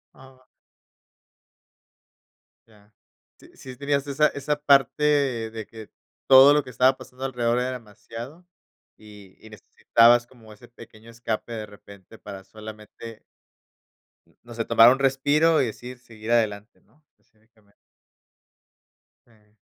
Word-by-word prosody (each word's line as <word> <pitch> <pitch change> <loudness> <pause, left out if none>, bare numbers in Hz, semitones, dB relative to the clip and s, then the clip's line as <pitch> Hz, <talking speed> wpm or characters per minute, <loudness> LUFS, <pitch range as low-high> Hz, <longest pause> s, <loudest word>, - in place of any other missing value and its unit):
Ah. 130 -1 -19 2.2
Ya. 105 -1 -25 0.5
Sí - - -19
sí 130 -1 -11
tenías 140 +1 -2
esa 145 +2 +2
esa 145 +1 -3
parte 140 -4 +1
de 110 -1 -8
que 110 -2 -13 0.4
todo 135 +2 +8
lo 150 0 +1
que 130 - -12
estaba 130 +2 +2
pasando 130 0 -10
alrededor 120 -2 -1
era 125 +1 -2
demasiado, 120 - -11 0.5
y 105 -3 -16
y 110 - -13
necesitabas 115 +3 +2
como 115 -4 -17
ese 120 +3 -18
pequeño 115 -1 -16
escape 115 0 -6
de 110 -2 -6
repente 100 0 -17
para 100 -2 -11
solamente 110 +1 -12 1.2
no 120 - -13
sé, 115 0 -4
tomar 115 +1 +6
un 130 - -1
respiro 145 +4 +2
y - - +1
decidir 125 +3 -10
seguir 115 -1 -9
adelante, 110 -2 -1
¿no? 150 - -33 0.2
Cívicamente. 110 -2 -33 1.5
Eh. 105 -2 -29
120 Hz, 125 wpm, -23 LUFS, 110-135 Hz, 2.2 s, todo